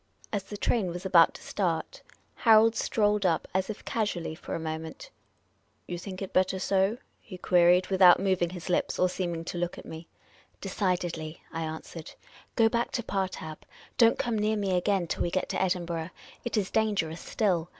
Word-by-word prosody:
As 205 Hz, -, 0 dB
the 205 Hz, -, -7 dB
train 215 Hz, -2 st, +1 dB
was 175 Hz, +2 st, -6 dB
about 175 Hz, -3 st, +5 dB
to -, -, -11 dB
start, 175 Hz, -5 st, -2 dB, 0.3 s
Harold 225 Hz, 0 st, +5 dB
strolled 210 Hz, -1 st, +1 dB
up 170 Hz, -4 st, +1 dB
as 190 Hz, +2 st, 0 dB
if 215 Hz, -, -7 dB
casually 205 Hz, -8 st, -2 dB
for 160 Hz, -, -6 dB
a -, -, -3 dB
moment. 160 Hz, -, -6 dB, 0.7 s
"You 175 Hz, -1 st, -5 dB
think 185 Hz, +1 st, -6 dB
it 190 Hz, -, -8 dB
better 185 Hz, 0 st, +2 dB
so?" 195 Hz, +3 st, +1 dB, 0.2 s
he 185 Hz, -5 st, -10 dB
queried, 180 Hz, 0 st, +4 dB
without 185 Hz, -2 st, +7 dB
moving 185 Hz, -3 st, +1 dB
his 175 Hz, -1 st, -8 dB
lips 180 Hz, -, 0 dB
or 185 Hz, -, +3 dB
seeming 175 Hz, -2 st, -3 dB
to 175 Hz, -, -4 dB
look 175 Hz, 0 st, -2 dB
at -, -, -10 dB
me. 160 Hz, +1 st, -9 dB, 0.3 s
" -, -, -31 dB
Decidedly," 175 Hz, -5 st, -2 dB
I 165 Hz, -, -3 dB
answered. 160 Hz, 0 st, -7 dB, 0.2 s
" -, -, -24 dB
Go 225 Hz, -, +5 dB
back 235 Hz, +1 st, 0 dB
to 240 Hz, -, -1 dB
Partab. 185 Hz, -6 st, -3 dB, 0.4 s
Don't 230 Hz, -1 st, +6 dB
come 230 Hz, -3 st, -1 dB
near 215 Hz, +1 st, +1 dB
me 195 Hz, -3 st, 0 dB
again 185 Hz, 0 st, +1 dB
till -, -, -4 dB
w^e 170 Hz, -, 0 dB
get 185 Hz, -, -1 dB
to -, -, -1 dB
Edinburgh. 175 Hz, -3 st, -1 dB, 0.3 s
It 240 Hz, -2 st, -2 dB
is 195 Hz, -3 st, -1 dB
danger 210 Hz, -7 st, +1 dB
ous 165 Hz, -, -8 dB
still. 180 Hz, -6 st, 0 dB
185 Hz, 190 wpm, -28 LUFS, 170-205 Hz, 0.7 s, without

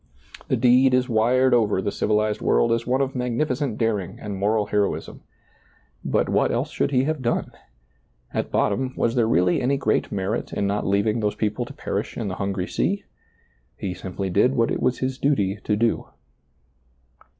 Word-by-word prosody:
The -, -, +1 dB
deed 125 Hz, +2 st, +5 dB
is 125 Hz, 0 st, +1 dB
wired 125 Hz, +3 st, +3 dB
over 110 Hz, -5 st, +3 dB
the 100 Hz, +1 st, -1 dB
civilized 105 Hz, 0 st, 0 dB
world 115 Hz, -, +2 dB
as 115 Hz, 0 st, 0 dB
one 130 Hz, +2 st, +2 dB
of 135 Hz, -1 st, -1 dB
magnificent 125 Hz, 0 st, -1 dB
daring 105 Hz, -3 st, -1 dB
and 105 Hz, -2 st, -5 dB
moral 105 Hz, +2 st, +1 dB
heroism. 105 Hz, -1 st, -2 dB, 0.8 s
But -, -, +1 dB
what -, -, +2 dB
else -, -, -1 dB
should -, -, 0 dB
he 130 Hz, -2 st, +2 dB
have 155 Hz, 0 st, -1 dB
done? 120 Hz, -1 st, -1 dB, 0.8 s
At -, -, -2 dB
bot -, -, +2 dB
tom, 130 Hz, 0 st, -2 dB
was 115 Hz, -, +1 dB
there 120 Hz, -3 st, +2 dB
really 90 Hz, -4 st, +2 dB
any 135 Hz, +3 st, +1 dB
great 110 Hz, -5 st, 0 dB
merit 100 Hz, +3 st, -2 dB
in 100 Hz, -, -1 dB
not 100 Hz, +1 st, -1 dB
leav 100 Hz, +1 st, +2 dB
ing 110 Hz, +1 st, +1 dB
those 105 Hz, -2 st, -1 dB
people 110 Hz, +3 st, -1 dB
to -, -, -10 dB
perish -, -, -4 dB
in 110 Hz, -4 st, -2 dB
the 95 Hz, -, -4 dB
hungry 95 Hz, -2 st, -1 dB
sea? 200 Hz, -, -1 dB, 0.7 s
He 95 Hz, -, -3 dB
simply 95 Hz, +1 st, -5 dB
did 125 Hz, +8 st, +3 dB
what 115 Hz, -2 st, +2 dB
it -, -, -2 dB
was 125 Hz, -, +1 dB
his 130 Hz, +1 st, -3 dB
duty 105 Hz, -9 st, +1 dB
to 105 Hz, -, +1 dB
do. 115 Hz, +2 st, 0 dB
115 Hz, 185 wpm, -23 LUFS, 100-130 Hz, 0.8 s, deed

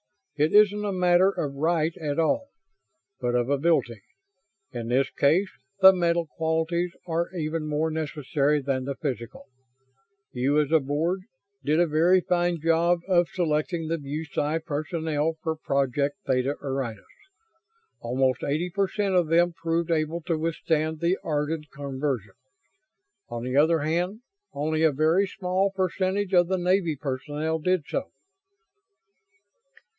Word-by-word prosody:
It 150 Hz, +1 st, +1 dB
isn't 210 Hz, 0 st, +5 dB
a 205 Hz, -, -1 dB
matter 180 Hz, 0 st, +4 dB
of 145 Hz, -7 st, -3 dB
right 160 Hz, +2 st, 0 dB
at 150 Hz, -3 st, -3 dB
all, 165 Hz, -, +1 dB, 0.7 s
but 120 Hz, 0 st, -1 dB
of 120 Hz, 0 st, +1 dB
ability. 140 Hz, -7 st, +1 dB, 0.7 s
In 120 Hz, -3 st, -5 dB
this 130 Hz, +2 st, +1 dB
case 175 Hz, +8 st, +2 dB, 0.3 s
the 190 Hz, 0 st, +10 dB
mental 170 Hz, -2 st, +1 dB
qualities 160 Hz, +3 st, -1 dB
are 170 Hz, 0 st, -1 dB
even 155 Hz, -1 st, -2 dB
more 155 Hz, +2 st, 0 dB
necessary 150 Hz, -1 st, 0 dB
than 135 Hz, -2 st, -2 dB
the 140 Hz, 0 st, -3 dB
physical. 120 Hz, -6 st, -5 dB, 0.9 s
You 135 Hz, +4 st, +1 dB
as 150 Hz, -1 st, 0 dB
a 160 Hz, -, +6 dB
Board 155 Hz, +7 st, -1 dB, 0.4 s
did 155 Hz, +3 st, +2 dB
a 175 Hz, -, +5 dB
very 170 Hz, +4 st, +3 dB
fine 175 Hz, -1 st, 0 dB
job 165 Hz, +2 st, +2 dB
of 175 Hz, -3 st, +3 dB
selecting 165 Hz, -1 st, -1 dB
the 165 Hz, +1 st, -1 dB
BuSci 150 Hz, +2 st, -3 dB
personnel 160 Hz, 0 st, -2 dB
for 160 Hz, -1 st, -1 dB
Project 140 Hz, 0 st, -1 dB
Theta 130 Hz, +1 st, +1 dB
Orionis. 135 Hz, -6 st, -4 dB, 1.0 s
Almost 130 Hz, +1 st, 0 dB
eighty 160 Hz, +5 st, -1 dB
per 195 Hz, +2 st, +1 dB
cent 200 Hz, 0 st, -1 dB
of 175 Hz, -3 st, +3 dB
them 170 Hz, +2 st, +3 dB
proved 165 Hz, 0 st, -1 dB
able 160 Hz, +1 st, 0 dB
to 165 Hz, -1 st, -2 dB
withstand 160 Hz, -1 st, -1 dB
the 175 Hz, +3 st, +1 dB
Ardan 150 Hz, 0 st, -2 dB
conversion. 135 Hz, -7 st, -3 dB, 1.0 s
On 120 Hz, 0 st, -5 dB
the 125 Hz, +1 st, -3 dB
other 160 Hz, +2 st, +4 dB
hand, 175 Hz, +8 st, -1 dB, 0.3 s
only 155 Hz, +2 st, -1 dB
a 160 Hz, -1 st, +5 dB
very 160 Hz, +7 st, +2 dB
small 185 Hz, +1 st, 0 dB
percentage 190 Hz, +1 st, -1 dB
of 175 Hz, -1 st, +5 dB
the 190 Hz, +1 st, 0 dB
Navy 180 Hz, -2 st, +1 dB
personnel 145 Hz, +3 st, -3 dB
did 180 Hz, 0 st, +1 dB
so." 275 Hz, -, -3 dB
160 Hz, 140 wpm, -26 LUFS, 145-175 Hz, 1.0 s, the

